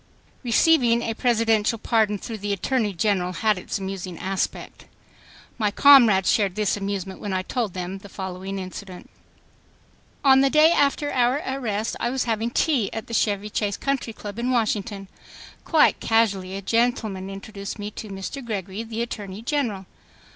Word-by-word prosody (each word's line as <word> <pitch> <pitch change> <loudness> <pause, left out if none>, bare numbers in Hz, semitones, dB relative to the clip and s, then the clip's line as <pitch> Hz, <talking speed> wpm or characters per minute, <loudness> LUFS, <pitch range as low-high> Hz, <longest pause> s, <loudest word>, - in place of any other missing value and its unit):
Receiving 240 -2 +3
a 225 - -2
Presidential 225 -2 +2
pardon 220 -2 +1
through 220 +2 -7
the 205 +1 -3
Attorney 220 +2 0
General 185 -1 0
had 210 +2 +1
its - - -4
amusing 190 -3 -5
aspect. 190 +2 -4 0.7
My 210 -2 +2
comrades 225 -6 +6
shared 200 -4 +1
this 210 -2 +1
amusement 195 -2 -4
when 205 -2 -3
I 185 0 -1
told 215 -2 -3
them 185 +1 -4
the 200 - -13
following 190 +1 -6
incident. 185 0 -8 1.1
On 265 -1 +7
the 275 - +4
day 305 +3 +6
after 290 -1 +1
our 255 +4 +2
arrest, 230 -5 -2
I 235 - 0
was 260 0 -1
having 230 -1 -1
tea 255 -4 +1
at 225 - -5
the 230 - -9
Chevy 210 -1 0
Chase 205 -1 -1
Country 275 -4 -2
Club 210 0 -8
in 245 +2 -1
Washington. 210 -4 -1 0.6
Quite 315 - +4
casually 200 -5 +1
a 195 - -6
gentleman 220 -4 0
introduced 200 +1 -7
me 205 0 -5
to 215 - -8
Mr. 195 +8 -6
Gregory, 200 -3 -4
the 230 0 -3
Attorney 205 -3 -7
General. 235 -8 -1
215 Hz, 160 wpm, -24 LUFS, 195-235 Hz, 1.1 s, On